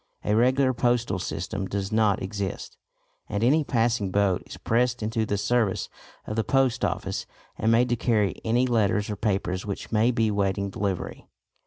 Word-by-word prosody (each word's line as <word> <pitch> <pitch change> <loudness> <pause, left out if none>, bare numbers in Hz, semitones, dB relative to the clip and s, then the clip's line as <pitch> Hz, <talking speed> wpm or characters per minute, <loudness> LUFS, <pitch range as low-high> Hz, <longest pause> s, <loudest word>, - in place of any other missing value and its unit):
A 105 - +1
regular 130 +3 +3
postal 120 -4 +1
system 95 +2 -4
does 100 +1 -3
not 110 -3 +2
exist, 95 -1 -4 0.5
and 100 +2 -1
any 150 +6 +4
passing 115 -6 +1
boat 100 -1 +1
is - - -9
pressed 120 0 0
into 110 0 -1
the 100 - 0
service 110 -1 0 0.4
of 105 - -4
the 110 - +1
Post 135 -1 +1
Office - - -2 0.3
and 110 - +1
made 120 +2 +4
to 120 - +2
carry 110 -4 0
any 120 +3 +2
letters 105 -3 +1
or - - -2
papers 95 -3 -1
which 100 -2 -6
may 110 +2 +3
be 115 -3 +1
waiting 100 -1 0
delivery. 95 -2 -3
110 Hz, 170 wpm, -26 LUFS, 100-120 Hz, 0.5 s, any